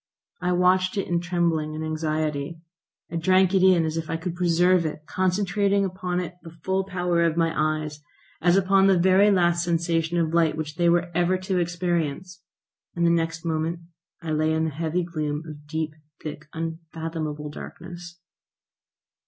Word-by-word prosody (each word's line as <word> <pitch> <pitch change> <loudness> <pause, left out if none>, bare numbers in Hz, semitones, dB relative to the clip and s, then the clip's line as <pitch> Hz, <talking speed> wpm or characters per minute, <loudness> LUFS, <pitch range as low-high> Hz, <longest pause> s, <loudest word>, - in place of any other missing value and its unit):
I 180 0 +1
watched 185 +2 +3
it 195 - -1
in 175 -1 +1
trembling 170 -3 0
and 160 0 -4
anxiety; 155 -1 -2 0.5
I 170 - -2
drank 185 +2 +3
it 190 - +4
in 185 -3 +5
as 160 +1 -2
if 165 0 -4
I 165 - -1
could 170 +1 -4
preserve 175 0 +3
it, 155 -1 -5
concentrating 195 +3 +1
upon 185 -1 -2
it 180 0 -5
the 165 - -10
full 190 0 0
power 180 -2 0
of 165 -1 +1
my 165 -1 +2
eyes, 155 -1 -1 0.4
as 175 +2 +4
upon 195 0 +4
the 190 -1 +5
very 190 +3 +5
last 175 -3 +3
sensation 170 -1 0
of 165 -1 0
light 165 -2 +3
which 155 -1 -4
they 170 0 +3
were 175 +1 +2
ever 175 +2 +2
to 190 -2 +1
experience, 175 0 -2 0.5
and 170 0 +1
the 170 - +4
next 165 0 -1
moment 165 +1 -1 0.4
I 160 - -3
lay 155 +1 +1
in 160 0 +1
the 160 - -1
heavy 165 +4 -1
gloom 155 -3 -3
of 150 -1 -10
deep, 155 0 -3 0.3
thick, 155 0 -7
unfathomable 160 -2 -5
darkness. 175 +2 -9
170 Hz, 170 wpm, -25 LUFS, 160-180 Hz, 0.5 s, in